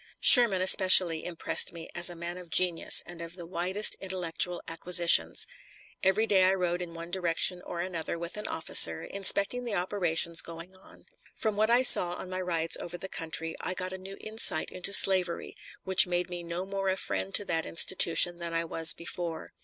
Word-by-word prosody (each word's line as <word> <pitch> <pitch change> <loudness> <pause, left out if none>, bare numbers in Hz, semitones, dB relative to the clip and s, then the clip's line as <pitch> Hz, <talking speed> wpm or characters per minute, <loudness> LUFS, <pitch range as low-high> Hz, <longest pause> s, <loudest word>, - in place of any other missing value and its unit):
Sherman 220 -7 +6
especially 185 -3 +6
impressed 175 -2 0
me 170 -1 -11
as 175 +1 +2
a 175 - -11
man 170 +1 -8
of 180 -2 -15
genius 175 0 +2
and 175 -1 -12
of 170 +1 -8
the 175 -2 -10
widest 185 +4 -1
intellectual 180 -2 -2
acquisitions. 165 - +2 0.6
Every 190 +4 0
day 190 -4 +1
I 190 +1 0
rode 180 -1 -4
in 170 -1 -10
one 170 +1 -11
direction 180 0 -2
or 170 -1 -8
another 170 -2 -6
with 170 0 -9
an 210 - -8
officer, 85 - +1
inspecting 200 +4 0
the 235 -4 -6
operations 175 -3 -1
going 170 +3 -13
on. 185 - -18 0.3
From 215 -2 -4
what 215 +2 -1
I 240 +2 +2
saw 175 -8 +8
on 185 +1 -10
my 185 0 -6
rides 165 -2 -4
over 175 0 -9
the 190 - -7
country 165 -1 -6
I 185 - -6
got 185 0 -6
a - - -8
new 195 +1 -12
insight 215 -7 0
into 185 +2 -4
slavery, 185 -3 +3 0.3
which 190 0 +4
made 180 0 -4
me 175 0 -8
no 170 +2 -8
more 195 0 -5
a 190 - -3
friend 95 - -5
to 205 - +1
that 165 -3 -5
institution 175 0 +2
than 170 -1 -7
I 165 0 -3
was 165 0 0
before. 170 -1 -9
180 Hz, 195 wpm, -26 LUFS, 170-190 Hz, 0.6 s, saw